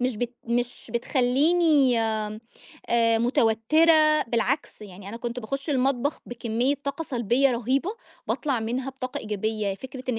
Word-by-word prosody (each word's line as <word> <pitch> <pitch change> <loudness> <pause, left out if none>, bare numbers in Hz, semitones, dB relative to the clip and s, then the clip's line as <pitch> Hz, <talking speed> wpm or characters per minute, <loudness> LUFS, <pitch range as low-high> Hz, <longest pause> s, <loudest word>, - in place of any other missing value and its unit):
مش 250 -3 0
بت 245 +2 -3
مش 240 0 -3
بتخلّيني 270 +2 +3
آآ 215 -1 -2 0.8
متوترة، 305 +6 +4
بالعكس 235 0 -1
يعني 195 0 -10
أنا 230 - -6
كنت 240 +1 -5
باخش 275 +6 -4
المطبخ 270 +1 0
بكمية 240 +3 -1
طاقة 280 +4 -3
سلبية 245 +3 +2
رهيبة، 255 - 0 0.4
باطلع 270 -6 -1
منها 245 +4 -3
بطاقة 260 -1 -5
إيجابية، 215 -1 -2
فكرة 260 +4 -9
إن 225 - -2
245 Hz, 130 wpm, -25 LUFS, 225-275 Hz, 0.8 s, متوترة